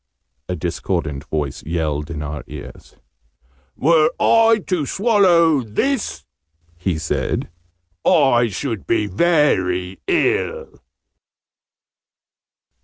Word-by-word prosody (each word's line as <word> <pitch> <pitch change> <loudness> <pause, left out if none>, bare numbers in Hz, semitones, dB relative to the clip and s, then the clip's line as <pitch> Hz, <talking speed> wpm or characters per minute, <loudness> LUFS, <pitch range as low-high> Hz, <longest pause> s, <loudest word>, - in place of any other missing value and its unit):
a 90 - -1
discordant 80 -4 -3
voice 75 -3 -3
yelled 75 -2 -2
in 75 -2 -5
our 75 0 -5
ears. - - -11 0.8
"Were 155 +1 +4
I 225 -2 +4
to 170 -7 -1
swallow 180 - +3
this,' 215 - -2 0.5
he 90 -1 -2
said, 75 -1 -2 0.5
'I 125 -6 +4
should 115 0 -4
be 110 -2 +1
very 95 - +1
ill!'" 430 +6 0
115 Hz, 90 wpm, -20 LUFS, -, 0.8 s, Were